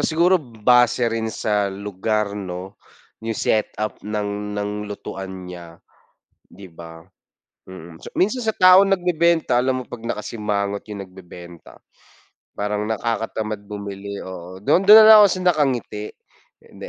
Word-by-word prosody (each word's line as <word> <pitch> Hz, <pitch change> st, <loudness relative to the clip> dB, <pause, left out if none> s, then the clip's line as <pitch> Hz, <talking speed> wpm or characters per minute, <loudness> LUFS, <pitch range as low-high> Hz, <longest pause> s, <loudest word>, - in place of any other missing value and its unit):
siguro 175 Hz, +3 st, +2 dB
base 120 Hz, 0 st, +2 dB
rin 110 Hz, -1 st, -2 dB
sa 105 Hz, -2 st, -1 dB
lugar, 100 Hz, +1 st, -3 dB
'no, 95 Hz, 0 st, -7 dB, 0.4 s
yung 110 Hz, 0 st, -4 dB
set 110 Hz, +1 st, 0 dB
up 110 Hz, 0 st, -4 dB
ng 105 Hz, -1 st, -4 dB
ng 105 Hz, 0 st, -2 dB, 0.2 s
lutuan 95 Hz, -2 st, -8 dB
niya, 85 Hz, -2 st, -10 dB, 0.7 s
'di 95 Hz, 0 st, -13 dB
ba? 80 Hz, 0 st, -12 dB, 0.6 s
Mm, 85 Hz, -3 st, -12 dB
so -, -, -9 dB
minsan 240 Hz, +7 st, +1 dB
sa 220 Hz, -, 0 dB
taong 185 Hz, +1 st, +6 dB
nagbebenta 170 Hz, -6 st, +1 dB
alam 130 Hz, +1 st, 0 dB
mo -, -, -14 dB
pag 115 Hz, -, -10 dB
nakasimangot 105 Hz, -3 st, -3 dB
yung 100 Hz, -2 st, -7 dB
nagbebenta 90 Hz, -2 st, -14 dB, 0.8 s
parang 105 Hz, 0 st, -2 dB
nakakatamad 110 Hz, -1 st, -3 dB
bumili, 100 Hz, -1 st, -7 dB
oo. 90 Hz, 0 st, -9 dB
Do'n, 175 Hz, -, +2 dB
do'n 210 Hz, +2 st, +9 dB
na -, -, +8 dB
lang 220 Hz, 0 st, +10 dB
ako -, -, +5 dB, 0.2 s
nakangiti. 130 Hz, -9 st, -1 dB, 0.5 s
Hindi -, -, -12 dB
105 Hz, 135 wpm, -21 LUFS, 95-125 Hz, 0.8 s, lang